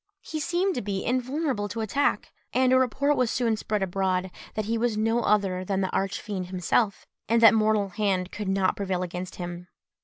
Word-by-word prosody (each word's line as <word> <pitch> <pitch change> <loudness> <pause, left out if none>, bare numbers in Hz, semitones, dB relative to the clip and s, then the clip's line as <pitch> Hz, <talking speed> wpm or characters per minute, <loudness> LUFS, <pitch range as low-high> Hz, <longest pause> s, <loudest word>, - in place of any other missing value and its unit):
He 310 - -4
seemed 355 +5 0
to 245 - -2
be 195 -1 -3
invulnerable 255 -3 -1
to 225 +2 -4
attack; 275 +6 0 0.2
and 255 0 +3
a 260 - +6
report 280 +4 +2
was 250 -4 +1
soon 230 -3 +1
spread 210 -1 -2
abroad, 185 0 -1 0.2
that 215 - -1
he 225 +2 0
was 230 -1 0
no 225 +2 +1
other 195 -4 +1
than 195 +1 -1
the 190 - -1
Arch 195 +1 -1
Fiend 190 -4 -4
himself, 190 +3 0 0.2
and 230 +1 +4
that 230 0 +8
mortal 215 -2 +2
hand 190 -2 -1
could 210 -1 -4
not 190 -1 +2
prevail 190 -2 -2
against 180 +1 -5
him. 175 0 -6
210 Hz, 195 wpm, -26 LUFS, 190-240 Hz, 0.2 s, that